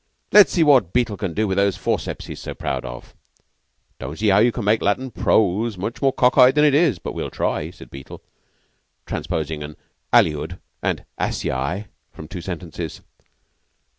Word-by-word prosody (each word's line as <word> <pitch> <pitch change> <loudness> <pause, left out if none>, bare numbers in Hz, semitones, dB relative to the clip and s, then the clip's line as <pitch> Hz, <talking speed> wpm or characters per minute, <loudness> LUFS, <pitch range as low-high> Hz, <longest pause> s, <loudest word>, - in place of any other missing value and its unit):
"Let's 210 -2 +7
see 170 - +4
what 130 - +4
Beetle 120 -4 +1
can 95 -5 -4
do 110 0 +1
with 95 -1 -1
those 100 -1 +2
forceps - - -2
he's - - -8
so - - -6
proud - - -3
of." - - -9 0.9
"Don't 75 - -6
see 105 0 +1
now 100 +1 +5
you 120 +3 +4
can 115 -2 -5
make 110 +2 +3
Latin 125 +6 0
prose 105 +1 +1
much 105 +6 -5
more 135 -1 +3
cock 125 +1 +3
eye 125 0 +9
than 150 +3 +3
it 145 - +4
is, 145 - +3
but - - -6
we'll - - -4
try," - - -2
said - - -14
Beetle, 70 0 -10 0.9
transposing 80 -1 -3
an 75 +1 -8 0.3
aliud 75 +4 +2 0.2
and - - -2
Asiae 70 +11 -2 0.3
from 80 - -10
two 90 - -7
sentences. 85 -3 -6
100 Hz, 175 wpm, -22 LUFS, 85-125 Hz, 0.9 s, eye